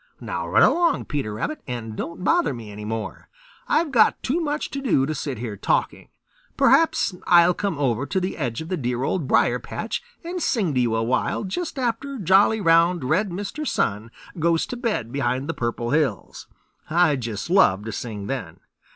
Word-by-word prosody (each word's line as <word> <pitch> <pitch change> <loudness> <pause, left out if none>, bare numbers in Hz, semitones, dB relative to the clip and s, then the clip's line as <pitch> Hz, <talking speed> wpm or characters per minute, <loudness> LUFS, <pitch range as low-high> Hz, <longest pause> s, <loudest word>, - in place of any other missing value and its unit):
Now - - -4
run - - +4
along, 345 0 +3
Peter 140 -8 -3
Rabbit, 305 - -3
and 115 -3 -5
don't 170 +8 -6
bother 340 - +2
me 110 -3 -9
any 105 +1 -8
more. 110 0 -5 0.4
I've 320 -2 +1
got 225 -5 +3
too 285 +7 0
much 300 -1 -2
to 275 - -4
do 185 - +2
to 155 - -2
sit 140 -3 -4
here 110 -2 -5
talking. 100 - -1 0.5
Perhaps 325 - +3
I'll 175 0 +6
come 195 -3 -2
over 135 -1 0
to 190 - 0
the 185 +1 -3
edge 125 -5 -3
of 160 - -8
the 185 - -1
dear 125 -2 -2
Old 160 -1 -1
Briar - - +3
patch - - -4 0.2
and 350 +1 -4
sing 200 - 0
to 130 - +1
you 120 -2 +1
a 115 - 0
while 125 - 0
just 295 - -4
after 260 +2 -2
jolly, 200 +2 +4
round, 170 -2 +3
red 180 +10 +1
Mr. 205 - -5
Sun 105 +3 -1 0.3
goes 165 0 +2
to - - -6
bed 230 - -2
behind 130 0 -1
the 165 - -2
Purple 120 -2 -3
Hills. 145 - -1 0.4
I 165 -2 +3
just 115 - -5
love 105 - +4
to 110 - -4
sing 105 -3 -5
then." 115 -9 -5
155 Hz, 190 wpm, -23 LUFS, -, 0.5 s, I'll